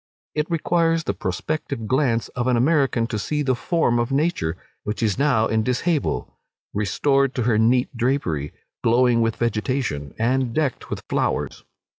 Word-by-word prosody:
It 150 Hz, 0 st, -1 dB
requires 165 Hz, 0 st, +1 dB
the 100 Hz, -, -1 dB
prospective 110 Hz, -, -3 dB
glance 125 Hz, -2 st, +1 dB
of 125 Hz, 0 st, -3 dB
an 125 Hz, -2 st, +3 dB
American 135 Hz, -3 st, +2 dB
to 115 Hz, -2 st, -3 dB
see 150 Hz, +7 st, -1 dB
the 130 Hz, -2 st, +2 dB
form 120 Hz, -2 st, +1 dB
of 120 Hz, +2 st, -1 dB
nature, 135 Hz, -, 0 dB, 0.2 s
which 105 Hz, +3 st, -3 dB
is 105 Hz, +1 st, +1 dB
now 130 Hz, -6 st, +3 dB
in 110 Hz, 0 st, +1 dB
dishabille, 140 Hz, +6 st, 0 dB, 0.5 s
restored 135 Hz, +7 st, +1 dB
to 125 Hz, -, 0 dB
her 110 Hz, -2 st, +2 dB
neat 125 Hz, +3 st, +2 dB
drapery, 115 Hz, -, -1 dB, 0.3 s
glowing 120 Hz, 0 st, +4 dB
with 115 Hz, -1 st, +1 dB
vegetation, 110 Hz, -, -2 dB
and 120 Hz, +1 st, 0 dB
decked 150 Hz, -4 st, -1 dB
with -, -, -4 dB
flowers. -, -, -1 dB
125 Hz, 155 wpm, -23 LUFS, 110-140 Hz, 0.5 s, glowing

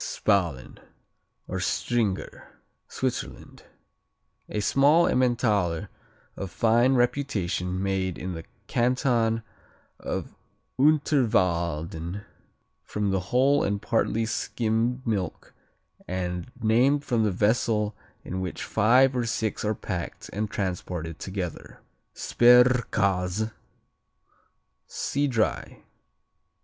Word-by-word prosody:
Spalen 90 Hz, -10 st, -1 dB, 0.7 s
or -, -, -3 dB
Stringer 110 Hz, -6 st, -2 dB, 0.3 s
Switzerland -, -, -4 dB, 0.9 s
A 105 Hz, -, -2 dB
small 145 Hz, +10 st, +4 dB
Emmentaler 110 Hz, -9 st, +1 dB, 0.5 s
of 95 Hz, -, -5 dB
fine 120 Hz, +7 st, +3 dB
reputation 100 Hz, -8 st, 0 dB
made 95 Hz, -2 st, -1 dB
in 90 Hz, 0 st, -5 dB
the 80 Hz, -1 st, -7 dB, 0.2 s
Canton 120 Hz, -2 st, +1 dB, 0.6 s
of -, -, -4 dB, 0.5 s
Unterwalden 90 Hz, -, +1 dB, 0.6 s
from 105 Hz, -2 st, -2 dB
whole 130 Hz, +10 st, +2 dB
and 100 Hz, 0 st, 0 dB
partly 115 Hz, +1 st, 0 dB
skimmed 115 Hz, +2 st, -1 dB
milk 100 Hz, -7 st, -3 dB, 0.5 s
and 90 Hz, +2 st, -3 dB
named 125 Hz, +6 st, +3 dB
from 115 Hz, -2 st, +1 dB
the 105 Hz, -, +2 dB
vessel 105 Hz, +2 st, +1 dB, 0.3 s
in 95 Hz, +1 st, -4 dB
which 90 Hz, -2 st, -4 dB
five 125 Hz, +5 st, +4 dB
or 120 Hz, -2 st, 0 dB
six 110 Hz, -2 st, -2 dB
are 105 Hz, 0 st, 0 dB
packed 85 Hz, -3 st, -6 dB
and 105 Hz, +1 st, -2 dB
transported 90 Hz, -5 st, -4 dB
together. 95 Hz, -3 st, -6 dB, 0.4 s
Sperrkäse 110 Hz, -5 st, +3 dB, 1.4 s
see 145 Hz, +1 st, -1 dB
Dry. 115 Hz, -5 st, -1 dB
110 Hz, 90 wpm, -26 LUFS, 95-120 Hz, 1.4 s, small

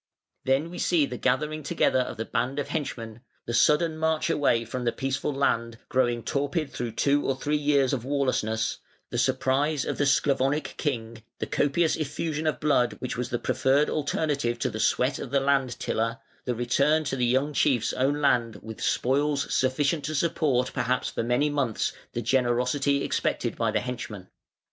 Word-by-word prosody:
Then 135 Hz, +6 st, +1 dB
we 180 Hz, -, -7 dB
see 165 Hz, -5 st, +3 dB
the 125 Hz, -3 st, -6 dB
gathering 150 Hz, +4 st, 0 dB
together 135 Hz, -2 st, +1 dB
of 125 Hz, -, -2 dB
the 115 Hz, -, -3 dB
band 125 Hz, +4 st, -1 dB
of 145 Hz, -, -2 dB
henchmen, 115 Hz, -7 st, -4 dB, 0.2 s
the 120 Hz, -, -4 dB
sudden 150 Hz, +6 st, +3 dB
march 160 Hz, 0 st, +1 dB
away 115 Hz, -5 st, +2 dB
from 125 Hz, +3 st, -4 dB
the 120 Hz, -, +1 dB
peaceful 135 Hz, +3 st, -2 dB
land, 115 Hz, -4 st, 0 dB
growing 120 Hz, -2 st, +1 dB
torpid 145 Hz, +5 st, -1 dB
through 120 Hz, -2 st, -4 dB
two 140 Hz, +4 st, +2 dB
or 135 Hz, -, 0 dB
three 145 Hz, +3 st, -1 dB
years 145 Hz, -3 st, +2 dB
of 125 Hz, -4 st, -2 dB
warlessness, 130 Hz, -5 st, 0 dB, 0.3 s
the -, -, -1 dB
surprise 140 Hz, +3 st, +1 dB
of -, -, -3 dB
the 145 Hz, -, +3 dB
Sclavonic 140 Hz, +1 st, +1 dB
king, 115 Hz, -6 st, -3 dB, 0.2 s
the -, -, -3 dB
copious 155 Hz, +3 st, +1 dB
effusion 155 Hz, +1 st, -3 dB
of 155 Hz, -, 0 dB
blood 140 Hz, -5 st, +2 dB
which 125 Hz, -, -5 dB
was 125 Hz, 0 st, -3 dB
the 120 Hz, -, -1 dB
preferred 135 Hz, +4 st, +2 dB
alternative 145 Hz, -5 st, -1 dB
to -, -, -1 dB
the 110 Hz, -, -5 dB
sweat 125 Hz, +4 st, +1 dB
of -, -, -6 dB
the 140 Hz, +1 st, +2 dB
land 135 Hz, -2 st, +1 dB
tiller, 115 Hz, +1 st, -1 dB, 0.3 s
the 125 Hz, -, -1 dB
return 140 Hz, +6 st, +2 dB
to 145 Hz, -2 st, -2 dB
the 125 Hz, -, -1 dB
young 135 Hz, +4 st, +1 dB
chief's 135 Hz, -5 st, +2 dB
own 140 Hz, +3 st, +1 dB
land 115 Hz, -5 st, +2 dB
with 110 Hz, 0 st, -8 dB
spoils 140 Hz, +3 st, +1 dB
sufficient 140 Hz, +4 st, +1 dB
to 155 Hz, +2 st, -3 dB
support 140 Hz, -5 st, +1 dB
perhaps 125 Hz, +2 st, 0 dB
for -, -, -2 dB
many 120 Hz, +5 st, +1 dB
months 135 Hz, -7 st, -1 dB, 0.2 s
the 120 Hz, -, -3 dB
"generosity" 125 Hz, +3 st, +1 dB
expected -, -, -1 dB
by -, -, 0 dB
the -, -, 0 dB
henchmen. 115 Hz, -6 st, -6 dB
135 Hz, 180 wpm, -26 LUFS, 120-145 Hz, 0.3 s, see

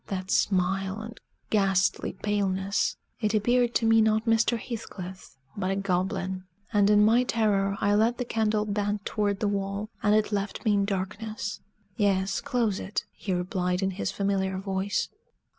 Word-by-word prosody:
That 190 Hz, -1 st, -4 dB
smile 190 Hz, +1 st, +1 dB
and 220 Hz, +2 st, -8 dB, 0.3 s
ghastly 195 Hz, -2 st, +2 dB
paleness! 200 Hz, -1 st, 0 dB, 0.2 s
It 215 Hz, -1 st, 0 dB
appeared 240 Hz, +3 st, +2 dB
to 230 Hz, -, +2 dB
me 225 Hz, 0 st, +5 dB
not 220 Hz, +1 st, +2 dB
Mr. 225 Hz, +1 st, +3 dB
Heathcliff, 190 Hz, -, -8 dB, 0.2 s
but 190 Hz, -2 st, -2 dB
a 195 Hz, -, +1 dB
goblin; 185 Hz, -1 st, -1 dB, 0.3 s
and 205 Hz, -1 st, +4 dB
in 210 Hz, 0 st, +6 dB
my 230 Hz, +3 st, +5 dB
terror 205 Hz, -5 st, +1 dB
I 205 Hz, -, +2 dB
let 225 Hz, +3 st, +3 dB
the 250 Hz, -, -2 dB
candle 215 Hz, -2 st, +1 dB
bend 205 Hz, 0 st, -1 dB
toward 205 Hz, -2 st, -1 dB
the 210 Hz, -, +2 dB
wall, 200 Hz, +2 st, -2 dB
and 210 Hz, 0 st, +4 dB
it 215 Hz, 0 st, +2 dB
left 200 Hz, +1 st, -3 dB
me 215 Hz, -, +4 dB
in 200 Hz, -1 st, +2 dB
darkness. 205 Hz, +2 st, -4 dB, 0.4 s
"Yes, 195 Hz, -2 st, +1 dB
close 225 Hz, -6 st, 0 dB
it," 200 Hz, -, -3 dB
he 195 Hz, -, -5 dB
replied 180 Hz, 0 st, -1 dB
in 190 Hz, -, +1 dB
his 190 Hz, -, -3 dB
familiar 195 Hz, -1 st, -1 dB
voice. 195 Hz, +1 st, -1 dB
200 Hz, 160 wpm, -27 LUFS, 190-215 Hz, 0.4 s, in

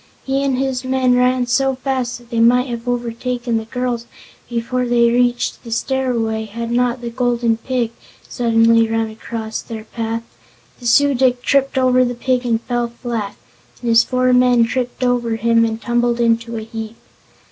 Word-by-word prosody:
He 270 Hz, +1 st, -1 dB
and 270 Hz, -2 st, 0 dB
his 265 Hz, -1 st, -1 dB
men 260 Hz, -1 st, +2 dB
ran 250 Hz, 0 st, +2 dB
so 265 Hz, +2 st, +1 dB
fast 255 Hz, -2 st, -2 dB
that 240 Hz, -1 st, -19 dB
they 230 Hz, -, 0 dB
might 245 Hz, +2 st, +4 dB
have 235 Hz, 0 st, -6 dB
overtaken 240 Hz, 0 st, -2 dB
the 220 Hz, -, -4 dB
girls 240 Hz, 0 st, -3 dB, 0.4 s
before 245 Hz, +1 st, -2 dB
they 235 Hz, -1 st, +3 dB
reached 245 Hz, 0 st, 0 dB
the 230 Hz, -, -9 dB
stairway 230 Hz, -3 st, -1 dB
had 230 Hz, +2 st, -5 dB
not 245 Hz, 0 st, +1 dB
the 235 Hz, -1 st, -5 dB
Golden 240 Hz, -2 st, +1 dB
Pig 240 Hz, -1 st, -2 dB, 0.4 s
suddenly 230 Hz, -1 st, +3 dB
run 225 Hz, -1 st, -1 dB
across 220 Hz, 0 st, -5 dB
their 220 Hz, -1 st, -8 dB
path. 230 Hz, 0 st, -4 dB, 0.6 s
The 240 Hz, -, -5 dB
Su 285 Hz, +4 st, +4 dB
dic 250 Hz, -1 st, +1 dB
tripped 275 Hz, -1 st, +1 dB
over 255 Hz, -1 st, +4 dB
the 245 Hz, 0 st, -2 dB
pig 250 Hz, 0 st, -1 dB
and 225 Hz, -1 st, +1 dB
fell 240 Hz, -1 st, -1 dB
flat, 235 Hz, -3 st, -5 dB, 0.4 s
and 240 Hz, -, -3 dB
his 230 Hz, 0 st, +6 dB
four 255 Hz, 0 st, +1 dB
men 250 Hz, -1 st, +5 dB
tripped 250 Hz, +1 st, -3 dB
over 245 Hz, -2 st, +1 dB
him 230 Hz, +1 st, +3 dB
and 225 Hz, -1 st, -1 dB
tumbled 240 Hz, +1 st, 0 dB
in 230 Hz, -1 st, +3 dB, 0.2 s
a 220 Hz, -, -3 dB
heap. 220 Hz, 0 st, -7 dB
240 Hz, 175 wpm, -18 LUFS, 230-250 Hz, 0.6 s, his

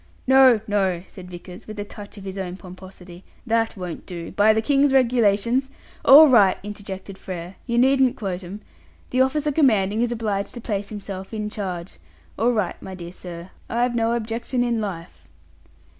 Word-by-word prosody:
"No, 260 Hz, -4 st, +6 dB
no," 190 Hz, -4 st, 0 dB
said 180 Hz, -2 st, -12 dB
Vickers, 180 Hz, +1 st, -11 dB
with 215 Hz, -1 st, -8 dB
a -, -, -2 dB
touch 205 Hz, 0 st, -11 dB
of 200 Hz, -, -10 dB
his 195 Hz, 0 st, -6 dB
old 180 Hz, -1 st, -5 dB
pomposity, 185 Hz, -1 st, -12 dB, 0.2 s
"that 225 Hz, -1 st, 0 dB
won't 180 Hz, -3 st, -7 dB
do. 170 Hz, -2 st, -7 dB
By 210 Hz, +1 st, +4 dB
the 220 Hz, -, +2 dB
King's 280 Hz, +2 st, +3 dB
Regulations 240 Hz, 0 st, +2 dB, 0.2 s
" -, -, -26 dB
"All 305 Hz, +3 st, +11 dB
right," 205 Hz, -8 st, +5 dB
interjected 195 Hz, -2 st, -8 dB
Frere, 180 Hz, 0 st, -7 dB
"you 235 Hz, -1 st, 0 dB
needn't 265 Hz, 0 st, +4 dB
quote 190 Hz, -4 st, -4 dB
'em. 195 Hz, +4 st, -8 dB, 0.5 s
'The 255 Hz, -, +2 dB
officer 295 Hz, +3 st, +1 dB
commanding 220 Hz, -8 st, +2 dB
is 240 Hz, 0 st, 0 dB
obliged 215 Hz, -3 st, -2 dB
to -, -, -6 dB
place 205 Hz, -3 st, -3 dB
himself 200 Hz, -1 st, -7 dB
in 210 Hz, -1 st, -3 dB
charge' 185 Hz, -, -6 dB, 0.4 s
all 235 Hz, +3 st, +2 dB
right, 210 Hz, -7 st, -2 dB
my 190 Hz, -, -8 dB
dear 175 Hz, -1 st, -9 dB
sir. 175 Hz, -1 st, -9 dB, 0.2 s
I've 240 Hz, +1 st, 0 dB
no 230 Hz, 0 st, +1 dB
objection 235 Hz, +2 st, -2 dB
in 235 Hz, -2 st, 0 dB
life." 165 Hz, -, -7 dB
205 Hz, 175 wpm, -23 LUFS, 185-235 Hz, 0.5 s, All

